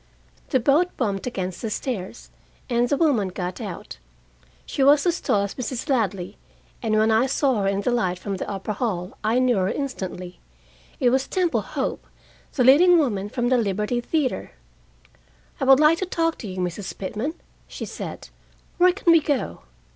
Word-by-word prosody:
The 260 - +3
boat 295 +8 +3
bumped 205 -3 -1
against 185 -6 -4
the 225 - -2
stairs, 215 -2 -5 0.4
and 240 0 +2
the 285 - +2
woman 270 - +2
got 180 0 -5
out. - - -7 0.7
She - - -3
was 285 +3 +5
as 350 0 +1
tall 200 -1 +1
as 200 - -4
Mrs. 255 +2 -4
Ladley, 200 -8 -1 0.4
and 220 -3 +1
when 220 +1 +3
I 225 +4 +3
saw 265 -4 +1
her 195 - 0
in 200 0 0
the 245 - 0
light 185 -7 0
from 195 +1 -4
the - - -5
upper 200 +1 -3
hall, 190 -5 -3
I 220 +3 +2
knew 255 -3 +3
her 185 0 +1
instantly. 185 -10 -5 0.6
It 245 - +3
was 265 +1 +1
Temple 360 -3 +1
Hope, - - -4 0.5
the 255 - +2
leading 340 +8 +7
woman 205 -10 0
from 240 +2 -1
the 255 -1 +3
Liberty 210 +3 -1
Theater. 280 0 -2 1.1
"I - - 0
would 265 0 +7
like 305 +2 +5
to 375 - -2
talk 330 -2 0
to 220 - -6
you, 185 -1 -7
Mrs. 180 +2 -4
Pitman," 220 - -3 0.3
she - - -6
said. - - -7 0.5
"Where 360 0 +6
can 355 -3 +2
we 330 -1 +6
go?" 290 -3 -2
240 Hz, 180 wpm, -23 LUFS, 200-280 Hz, 1.1 s, leading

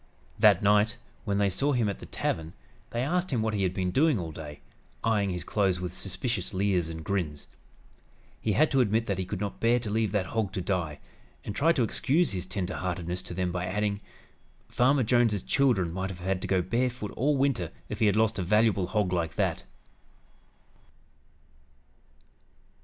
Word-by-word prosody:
That - - +6
night, 105 +3 +3 0.3
when 100 -2 0
they 100 -1 +2
saw 140 +10 +1
him 120 -4 +2
at 100 - -3
the - - -10
tavern, 80 +1 -3 0.4
they 120 +1 -2
asked 180 +6 0
him 120 -5 0
what 110 -1 0
he 100 - -1
had 95 -2 +1
been 90 -1 -1
doing 150 - +3
all 85 -4 -4
day, 75 -2 -9 0.4
eying 105 -3 +2
his 90 -2 -3
clothes 95 -2 +1
with 90 -1 -4
suspicious 100 +1 -3
leers 95 -4 +1
and 80 -1 -6
grins. 80 -6 -2 0.9
He 110 - 0
had 155 +7 +3
to 135 - +3
admit 115 0 +1
that 100 -3 -2
he 95 - -1
could 95 -1 -4
not 100 0 -4
bear 115 +1 +3
to 115 -4 -4
leave 110 -2 +1
that 100 -3 0
hog 105 +2 -2
to - - -2
die, 85 -5 -2 0.5
and 105 - -5
tried 165 +4 +3
to 125 - +2
excuse 155 +8 +1
his 95 -1 -4
tender 95 -2 -3
heartedness 90 0 -3
to 90 - -7
them 90 -1 -1
by 90 0 -2
adding: 100 +1 -1 0.7
"Farmer 130 +2 +3
Jones's 115 -4 +2
children 110 -12 +2
might 95 +1 -2
have 95 - -7
had 95 +1 -2
to - - -4
go 95 -2 +2
barefoot 120 +1 -1
all 145 +3 +1
Winter 130 - +1 0.2
if 105 - -6
he 110 - +4
had 100 - +3
lost 110 -1 +2
a - - +1
valuable 105 0 +2
hog 100 -1 0
like 85 -2 -1
that!" - - -1
100 Hz, 190 wpm, -28 LUFS, 90-115 Hz, 0.9 s, That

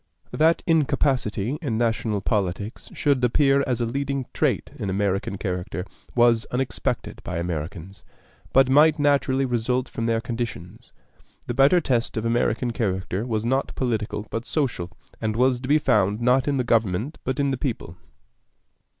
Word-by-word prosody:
That 160 +2 +3
incapacity 135 - +1
in 125 -9 -2
national 110 -3 0
politics 100 +1 -2
should 140 -4 +1
appear 135 +3 +3
as 125 -2 -1
a - - +2
leading 140 +2 -2
trait - - 0
in 100 - -3
American 100 0 -1
character 90 -1 -4 0.3
was 120 -1 +4
unexpected 125 0 -2
by 85 - -4
Americans, 85 +4 -5 0.5
but 135 0 +5
might 150 +4 +5
naturally 140 -2 +2
result 125 +1 0
from 115 - -3
their 115 -1 +1
conditions. 115 -2 -6 0.5
The - - -3
better 140 +8 +5
test 120 -7 -1
of 110 - -2
American 120 +1 +1
character 95 -1 -2
was 110 -2 -1
not 130 +3 0
political 110 -4 -2
but 115 - -3
social, 115 - -2 0.3
and 110 -1 -1
was 125 +1 +2
to 130 - -6
be 150 +3 +5
found 105 -8 +2
not 125 +3 +2
in 140 -1 +1
the 130 - +1
government 115 - 0
but 130 +2 -2
in 140 -1 +2
the - - 0
people. 115 - -4
120 Hz, 155 wpm, -24 LUFS, 105-135 Hz, 0.5 s, but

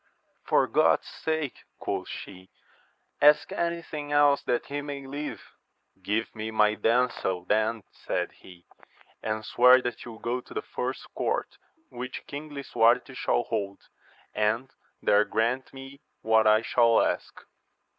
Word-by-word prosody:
For - - +4
God's - - +3
sake, 155 -4 -3 0.2
quoth - - -4
she, 95 -1 -9 0.7
ask 150 +1 +5
any 170 0 -2
thing 150 -2 -6
else 145 -1 +4
that 120 - 0
he 145 +1 -4
may 140 -1 -6
live! 145 +2 -5 0.6
Give 105 +4 -1
me, 110 0 -4
my 105 -1 +3
damsel, 115 -6 0
then, 110 +2 +1
said - - -3
he, 90 -2 -16 0.6
and 110 0 -3
swear 125 +3 +6
that 120 -2 -4
you 120 - -8
will - - -12
go 125 +2 -2
to - - -14
the 430 - -2
first - - -5
court - - -2 0.3
which 125 +1 -7
King 145 +2 -7
Lisuarte 125 -4 +2
shall - - 0
hold, 100 -1 -4 0.4
and 115 +5 0 0.3
there 105 +1 +5
grant 115 +5 -1
me 135 +1 -11 0.2
what 110 0 +4
I 110 +1 +5
shall 115 -1 +4
ask. - - -1
120 Hz, 145 wpm, -27 LUFS, 110-140 Hz, 0.7 s, swear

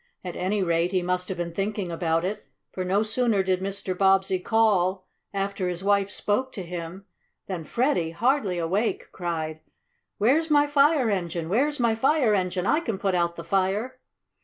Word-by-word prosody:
At 180 -2 -6
any 195 +2 0
rate 170 0 +1
he 185 -2 +1
must 180 0 -2
have 190 - -3
been 170 -1 -4
thinking 195 -1 -2
about 165 0 0
it, 205 +3 -4 0.2
for, 185 - -4
no 195 +3 +1
sooner 220 -2 +1
did 185 -1 0
Mr. 195 -1 -3
Bobbsey 190 0 +3
call, 190 -3 +2 0.3
after 195 -2 -2
his 175 +1 -4
wife 200 0 +2
spoke 210 +6 -1
to 190 - -5
him, 175 +2 -7 0.4
than 180 -4 -4
Freddie, 235 - 0
hardly 210 - +1
awake, 190 +7 -1
cried: 160 -3 -4 0.6
"Where's 285 +10 +2
my 290 -1 +5
fire 290 -4 +3
engine? 170 -3 -2
Where's 280 +9 +1
my 235 -2 +3
fire 255 0 +2
engine? 180 -2 0
I 305 - +3
can 225 -11 -3
put 195 -1 0
out 170 -1 +1
the 170 - -7
fire!" 195 +8 -1
195 Hz, 175 wpm, -25 LUFS, 180-220 Hz, 0.6 s, my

